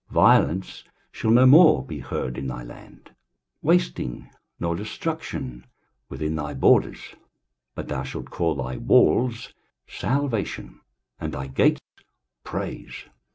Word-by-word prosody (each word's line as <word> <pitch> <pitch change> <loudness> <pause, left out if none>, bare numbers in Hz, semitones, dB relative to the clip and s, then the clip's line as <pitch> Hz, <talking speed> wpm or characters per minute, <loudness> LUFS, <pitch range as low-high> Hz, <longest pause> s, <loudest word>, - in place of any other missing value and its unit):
23:060:018 - - -15
Violence 95 +3 +3 0.3
shall 110 - -3
no 120 +3 +6
more 150 - +7
be - - -7
heard 65 - -4
in 70 0 -5
thy 60 -2 -6
land, - - -14 0.5
wasting 170 - 0 0.3
nor 85 -1 -1
destruction 105 - -5 0.5
within 75 0 -3
thy 75 -2 -4
borders; 65 - +2 0.6
but - - -6
thou 65 - -3
shalt 70 - -7
call 80 -2 0
thy 65 -2 -4
walls 120 - +2 0.3
Salvation, 115 - -3 0.4
and - - -4
thy 65 - -4
gates 65 0 +2 0.6
Praise. - - -6
85 Hz, 120 wpm, -24 LUFS, -, 0.6 s, more